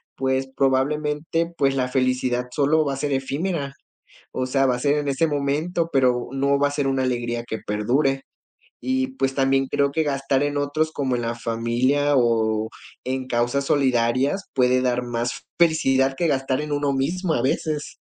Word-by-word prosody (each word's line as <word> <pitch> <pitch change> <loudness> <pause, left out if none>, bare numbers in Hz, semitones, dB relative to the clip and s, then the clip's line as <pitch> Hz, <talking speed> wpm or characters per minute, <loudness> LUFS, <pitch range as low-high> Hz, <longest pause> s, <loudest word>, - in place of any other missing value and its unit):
pues, 130 0 0
probablemente, 150 +5 0
pues, 135 -1 +2
la 130 -1 0
felicidad 125 -1 0
solo 150 +4 +2
va 140 - -1
a - - -8
ser 145 0 -1
efímera. 140 +2 -2 0.6
O 130 - -2
sea, 135 +1 +2
va 125 - +2
a - - -6
ser 145 +2 +2
en 145 - -3
ese 140 +4 +2
momento, 150 +4 -1
pero 125 -2 +2
no 140 +1 +1
va 145 0 +3
a - - -6
ser 145 -1 -1
una 135 -1 +1
alegría 120 -2 -2
que 110 -1 -4
perdure. 135 +6 +1 0.6
Y, 260 0 0
pues, 135 - 0
también 135 0 +2
creo 140 0 +1
que 160 - +1
gastar 135 -2 0
en 145 0 -1
otros 145 +2 0
como 135 -4 -1
en 120 - -3
la 115 0 -2
familia 120 +5 +1
o 110 -3 +2 0.4
en 130 0 -3
causas 120 +3 0
solidarias 130 +5 +1
puede 125 -1 +3
dar 125 -1 +1
más 120 0 -3 0.2
felicidad 135 -5 +3
que 170 - +1
gastar 135 -2 0
en 150 -1 -4
uno 145 -1 0
mismo 160 +6 -1
a 120 - 0
veces. 150 +3 -2
135 Hz, 180 wpm, -23 LUFS, 125-145 Hz, 0.6 s, va